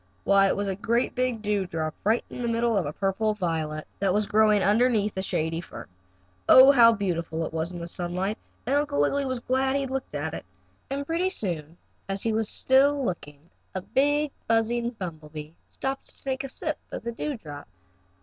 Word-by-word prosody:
Why, 195 0 +5
it - - 0
was 200 0 -1
a 195 - 0
great 235 +4 0
big 250 -3 -1
dewdrop, 180 -7 -1
right 220 +4 +2
in - - -8
the 240 - -1
middle 230 0 +1
of 185 -7 +1
a - - -2
purple 200 +5 0
violet, 160 -5 -2
that 195 -1 +1
was 210 0 +2
growing 210 -1 +4
underneath 215 0 +2
a 190 - -1
shady 165 -3 -1
fern. - - -10 0.6
Oh, 260 +2 +10
how 235 -4 +7
beautiful 170 -5 -2
it - - -7
was 165 +2 -2
in 175 - -7
the 170 - -5
sunlight, 180 +4 -3 0.3
and 270 +4 +2
Uncle 290 - 0
Wiggily 275 - +2
was 255 -2 -2
glad 265 +2 +1
he 280 - +1
had 270 -1 -4
looked 270 0 -4
at - - -3
it. - - -6 0.5
And 280 +1 -3
pretty 335 +5 0
soon, 170 - -4 0.3
as 195 0 -2
he 225 - +1
was 220 -1 0
still 275 +1 +3
looking, 150 -4 -6 0.2
a 190 - -2
big, 290 +4 +1 0.2
buzzing 230 +1 +1
bumble 170 -9 -7
bee 150 0 -7 0.2
buzzed - - -21
along 270 - +2
and 270 - -15
stopped - - -12
to - - -21
take 265 0 -2
a 275 - -5
sip - - -3
of - - -6
the 235 - -3
dewdrop. 215 - -6
210 Hz, 210 wpm, -26 LUFS, 175-255 Hz, 0.6 s, Oh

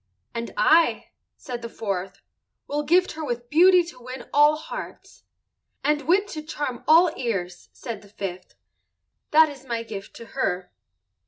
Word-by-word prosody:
"And 235 0 -4
I," 330 +1 +4 0.3
said 245 -3 -6
the 230 - -6
fourth, 195 -3 -4 0.4
"will 295 +1 -2
gift 355 +5 +3
her 315 0 -6
with 240 -3 -4
beauty 360 +3 +6
to 330 -7 -12
win 255 +2 -8
all 295 +1 +6
hearts." 310 - -9 0.6
"And 295 -1 +1
wit 395 +4 +3
to 310 - -5
charm 295 -5 -4
all 330 +1 +6
ears," 185 -8 -3
said 225 -4 -7
the 205 - -17
fifth. 185 -3 -7 0.7
"That 315 +1 +6
is 285 -3 -10
my 235 -3 -3
gift 205 -3 -8
to 230 - -10
her." 180 -8 -2
260 Hz, 155 wpm, -24 LUFS, 220-310 Hz, 0.7 s, beauty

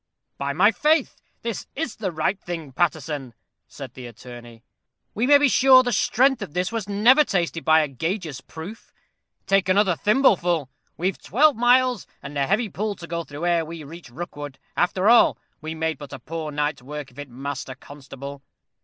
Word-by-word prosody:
"By 140 0 -1
my 195 +8 +5
faith! 305 +2 +1 0.2
this 230 -3 -4
is 295 -5 -4
the 195 -4 -3
right 170 +5 -1
thing, 165 -6 -6
Paterson," 145 -4 -2 0.3
said - - -10
the 125 -1 -9
attorney. 120 0 -12 0.5
"We 230 +4 0
may 285 0 +8
be 290 0 +4
sure 260 0 +6
the 245 - -1
strength 255 +5 +2
of 180 -6 -7
this 180 +2 0
was 225 -3 -4
never 235 +9 +5
tested 170 - -1
by 160 0 +5
a 150 - 0
gauger's 155 - -4
proof. 165 +11 -10 0.5
Take 195 -1 +2
another 190 -2 +3
thimbleful. 175 - +2 0.3
We've 185 +2 -2
twelve 290 - +3
miles 245 -1 +3 0.2
and 140 +1 -8
a 140 -1 0
heavy 215 - +1
pull 210 +1 -3
to 175 - -10
go 170 0 -4
through 150 +2 -6
ere 170 -1 +2
we 160 0 -8
reach 165 +1 -11
Rookwood. 145 -1 -7 0.2
After 185 +2 +1
all, 235 +1 +6 0.2
we 160 +1 -5
made 160 -1 -2
but 145 -2 -10
a - - -5
poor 155 +3 -5
night's 150 -1 -2
work 145 +1 -7
of 125 - -15
it, 145 -1 -7
Master 135 +1 -6
Constable. 140 0 -10
170 Hz, 180 wpm, -23 LUFS, 145-210 Hz, 0.5 s, may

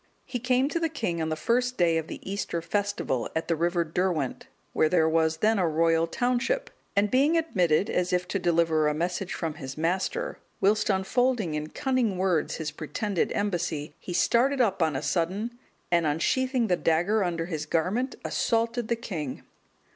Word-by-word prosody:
He 245 - -4
came 255 +2 +2
to 335 - -1
the 330 -1 0
king 175 - -2
on 160 - -1
the 155 - -1
first 250 +8 0
day 165 -2 +3
of 160 - -6
the - - -7
Easter 195 -3 -2
festival,(214) 170 - -2
at 160 - -1
the 165 - +1
river 170 +2 +1
Derwent, 165 -4 -1 0.3
where 155 - +3
there 160 -2 +3
was 160 0 +2
then 215 +4 +2
a 180 - +2
royal 165 +1 +2
township,(215) 250 - 0 0.2
and 200 +1 +2
being 285 +6 +4
admitted 190 - +2
as 180 -4 0
if 180 0 0
to 200 - -1
deliver 165 -3 +2
a 150 - +1
message 180 +3 -2
from 165 -2 -3
his 135 -1 -8
master, 190 - -1 0.2
whilst 210 +2 +2
unfolding 210 0 +1
in 150 0 -3
cunning 255 - 0
words 180 -4 +1
his 155 -2 -4
pretended 170 +5 -2
embassy, 175 -7 -2
he - - -8
started 255 +9 +2
up 200 -7 +2
on 160 -3 +2
a - - -2
sudden, 200 +8 -1 0.3
and 170 -2 +3
unsheathing 255 - +1
the 185 -4 +2
dagger 175 +6 +2
under 170 -2 -1
his 155 -3 -4
garment, 195 - 0
assaulted 230 0 0
the 235 - +1
king. 165 - -5
180 Hz, 180 wpm, -27 LUFS, 165-230 Hz, 0.3 s, being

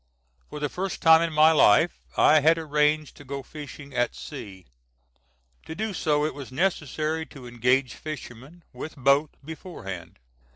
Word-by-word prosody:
For 150 - -7
the 145 - -1
first 190 +6 -4
time 160 0 +7
in 170 -1 0
my 155 +1 +6
life 160 +2 +4 0.2
I 155 - +6
had 160 +3 +4
arranged 150 -1 0
to - - -12
go 140 0 -6
fishing 145 0 -10
at 120 -1 0
sea. 100 - -9 1.0
To 160 - -6
do 215 +3 -3
so 150 -3 +1
it 155 - -2
was 135 -2 -9
necessary 155 0 -1
to 135 -4 -12
engage 125 +2 +1
fishermen, 150 +2 -9
with 155 - -7
boat, 140 +3 +3 0.2
beforehand. 140 - -8
150 Hz, 155 wpm, -25 LUFS, 135-160 Hz, 1.0 s, time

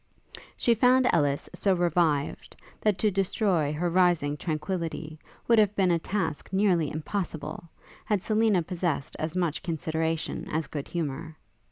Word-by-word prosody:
She 235 - +3
found 250 +2 +4
Ellis 145 -2 +1
so 195 -2 +2
revived, 165 -4 0 0.3
that 210 -3 +2
to 210 +3 +2
destroy 190 -5 +1
her 160 +4 -1
rising 175 -5 +2
tranquillity 160 -1 -4 0.3
would 230 -2 +5
have 210 -1 +3
been 185 -2 +3
a 170 - +2
task 165 -4 -3
nearly 190 -6 +2
impossible, 160 -1 -4 0.4
had 205 -3 0
Selina 215 -5 +2
possessed 170 -5 -2
as 155 +2 -3
much 170 -4 0
consideration 160 0 -2
as 160 0 -1
good 145 0 -6
humour. 160 -1 -4
170 Hz, 140 wpm, -27 LUFS, 155-195 Hz, 0.4 s, would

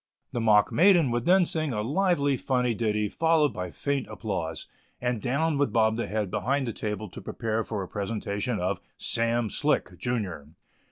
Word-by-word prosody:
The 120 - -2
mock 105 -2 +4
maiden 175 -7 +5
would 120 0 -1
then 185 0 +5
sing 155 -5 -1
a 105 -1 -1
lively, 145 - +2
funny 125 -1 0
ditty, 105 -1 0
followed 160 +3 +2
by 90 0 -4
faint 140 - -2
applause, 85 -7 -4 0.3
and 120 -3 -1
down 140 +4 0
would 145 - +2
bob 110 -1 +3
the 120 - -2
head 105 -3 -2
behind 135 +1 0
the 115 - -3
table 105 0 -4
to - - -10
prepare 115 -1 -2
for 105 -3 -4
a - - -7
presentation 105 +3 -3
of 90 +1 -1 0.2
"Sam 115 0 0
Slick, - - 0
junior." 95 -12 -3
115 Hz, 175 wpm, -27 LUFS, 105-140 Hz, 0.3 s, maiden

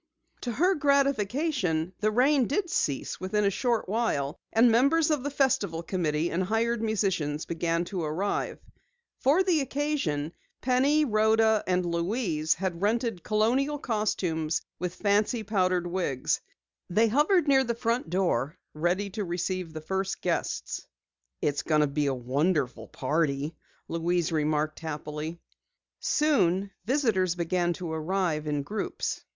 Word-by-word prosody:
To 245 - -3
her 360 - +3
gratification, 275 - +1
the 215 - +2
rain 255 +3 +3
did 350 +4 -1
cease 140 - -1
within 205 +3 0
a 200 - +3
short 235 +3 0
while, 185 -9 0 0.2
and 230 +1 +5
members 300 +7 +4
of 300 -3 +1
the 285 - -2
Festival 225 - +1
Committee 165 -2 -1
and 175 - 0
hired 225 +4 0
musicians 190 -9 0
began 170 0 -1
to 185 0 -4
arrive. 165 +7 -2 0.6
For 305 +8 +4
the 350 -5 +2
occasion, 270 - -1 0.3
Penny, 275 +5 +3
Rhoda, 220 -1 +3
and 180 -1 +1
Louise, 170 -2 0
had 180 -1 -3
rented 225 -2 0
colonial 245 - +1
costumes 180 - -1 0.2
with 180 +1 -3
fancy 210 +4 +1
powdered 185 -4 +1
wigs. 170 -8 -1 0.5
They 220 +6 +3
hovered 300 - +3
near 270 -1 +5
the 235 -2 -2
front 230 -5 -1
door, 170 -4 0 0.2
ready 180 +6 0
to 210 +2 -3
greet 180 -1 -3
the 155 0 -7
first 190 +4 -2
guests. - - -2 0.6
"It's 145 -1 +1
going 155 -1 +2
to - - +4
be 145 0 -1
a - - +2
wonderful 130 -2 0
party," 145 +1 -1 0.3
Louise 170 0 0
remarked 155 0 0
happily. 155 +1 -5 0.6
Soon 200 - +2
visitors 215 - +1
began 175 0 0
to 170 -1 -5
arrive 160 -1 -1
in 145 -1 -1
groups. 205 +7 -3
190 Hz, 135 wpm, -28 LUFS, 160-235 Hz, 0.6 s, and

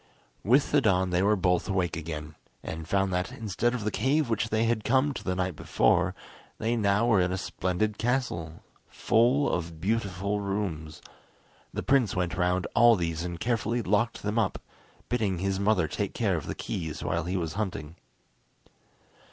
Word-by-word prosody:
With 130 +7 +3
the 145 - +4
dawn 95 -5 +2
they 90 +1 +2
were 105 +2 +4
both 90 0 +1
awake 90 -3 0
again, 75 -2 -6 0.3
and 80 0 -6
found 95 0 +1
that, 90 +5 -1
instead 120 0 -1
of 115 - -4
the 105 - -1
cave 135 +1 +1
which 110 0 0
they 110 +1 +1
had 115 -2 +1
come 135 +3 +2
to - - -7
the 95 - -1
night 90 -2 -1
before, - - +2 0.4
they 115 +2 0
now 105 0 +2
were 110 -6 +4
in 90 0 +1
a 95 - -1
splendid 95 +3 -2
castle, 115 - -2 0.3
full 125 +5 +2
of 85 -2 -3
beautiful 100 0 -1
rooms. 95 -6 -4 0.7
The - - -4
prince 130 -7 +2
went 90 -1 -1
round 90 0 +1
all 120 0 +6
these 85 -3 -2
and 85 -1 -5
carefully 120 +1 0
locked 105 +4 0
them 105 +3 0
up, 105 - 0 0.5
bidding 105 -6 0
his 95 +2 -1
mother 100 -5 +2
take - - -3
care - - +1
of - - -4
the - - -4
keys 80 -4 -4
while - - -1
he 90 +2 -1
was 80 -3 -3
hunting. 95 -7 -4
100 Hz, 175 wpm, -28 LUFS, 90-115 Hz, 0.7 s, all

